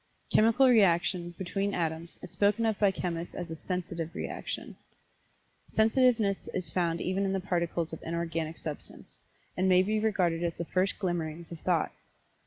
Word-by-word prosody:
Chemical 230 +5 +5
reaction, 175 -5 +3
between 195 +2 -2
atoms, 165 0 -3
is 180 - -8
spoken 210 +3 +2
of 220 -2 0
by 205 - +5
chemists 175 -3 -4
as 175 -2 -5
a - - -3
"sensitive" 170 0 -4
reaction. - - -5 0.9
Sensitiveness 220 -3 +2
is 175 -5 -3
found 170 -2 +1
even 190 +2 0
in 195 -1 0
the 195 - 0
Particles 170 -3 -1
of 160 - -6
Inorganic 165 -1 -3
Substance, 150 -2 -8 0.4
and 185 +1 +2
may 185 0 +6
be 215 +2 0
regarded 180 -6 +1
as 170 -1 -1
the 170 - -4
first 185 +3 +1
glimmerings 170 -3 -3
of 170 - -7
thought. 170 -2 +1
180 Hz, 160 wpm, -30 LUFS, 170-200 Hz, 0.9 s, may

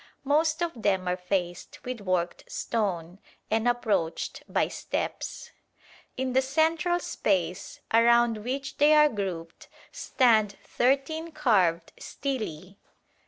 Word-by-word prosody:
Most 310 +4 +2
of 340 - -1
them 190 -3 +1
are 180 - +1
faced 180 -1 -3
with 250 -3 -5
worked 180 -3 -1
stone, 185 -5 -2 0.3
and 220 +2 +1
approached 220 -9 -1
by - - +2
steps. - - -4 0.7
In 260 0 -2
the 260 - +4
central 320 +5 +1
space 180 - -2
around 235 0 +5
which 270 +3 -4
they 300 +1 +5
are 300 0 +6
grouped 180 - -5 0.2
stand 220 -6 +2
thirteen 280 +6 0
carved 190 - +2
stelae. 200 - -5
230 Hz, 115 wpm, -27 LUFS, 185-275 Hz, 0.7 s, are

